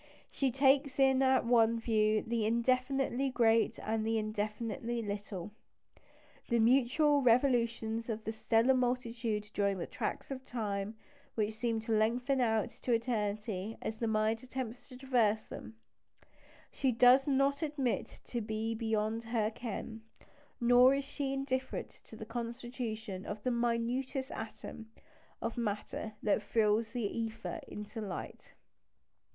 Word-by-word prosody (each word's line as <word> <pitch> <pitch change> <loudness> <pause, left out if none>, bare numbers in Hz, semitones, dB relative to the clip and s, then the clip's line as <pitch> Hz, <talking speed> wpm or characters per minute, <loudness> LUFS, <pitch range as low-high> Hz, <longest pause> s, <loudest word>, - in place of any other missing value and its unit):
She 275 - +1
takes 270 +1 +3
in 265 -1 +5
at 260 -1 +4
one 230 -1 +4
view 215 -2 +2
the 230 -1 -1
indefinitely 255 +3 +1
great 230 -2 +3
and 220 0 -1
the 225 +1 +1
indefinitely 220 +3 -2
little. 200 -2 -5 1.0
The 235 - +3
mutual 275 +5 +4
revolutions 235 -2 +2
of 220 -1 -3
the 220 - -2
stellar 225 +3 +3
multitude 235 -4 -1
during 200 -3 0
tracts - - -4
of 260 -1 -5
time 215 -3 -3 0.4
which 215 -1 0
seem 225 0 -1
to 225 - -5
lengthen 245 +5 +2
out 220 -3 +2
to 250 - -1
eternity 215 -3 -1
as 220 - -4
the 230 - 0
mind 220 +1 +1
attempts 255 -1 -6
to 255 - -10
traverse 235 -5 +1
them, 225 - -8 1.0
she 265 -2 +1
does 250 +3 +6
not 275 +1 +2
admit 285 -6 -2
to 240 - -3
be 220 +1 -2
beyond 220 0 -1
her 225 -2 0
ken; 225 -1 -6 0.6
nor 245 +2 +6
is 280 - -1
she 280 -1 -3
indifferent 265 -1 -2 0.2
to - - -11
the 220 - -7
constitution 230 -3 -5
of 205 0 -6
the 255 - +1
minutest 240 +3 -1
atom 220 0 -7 0.5
of 230 +1 -2
matter 215 0 -3
that 210 0 +2
thrills 215 +1 +2
the 240 -2 -3
ether 225 +1 -4
into 210 +2 -7
light. 200 -4 -7
230 Hz, 135 wpm, -33 LUFS, 220-255 Hz, 1.0 s, does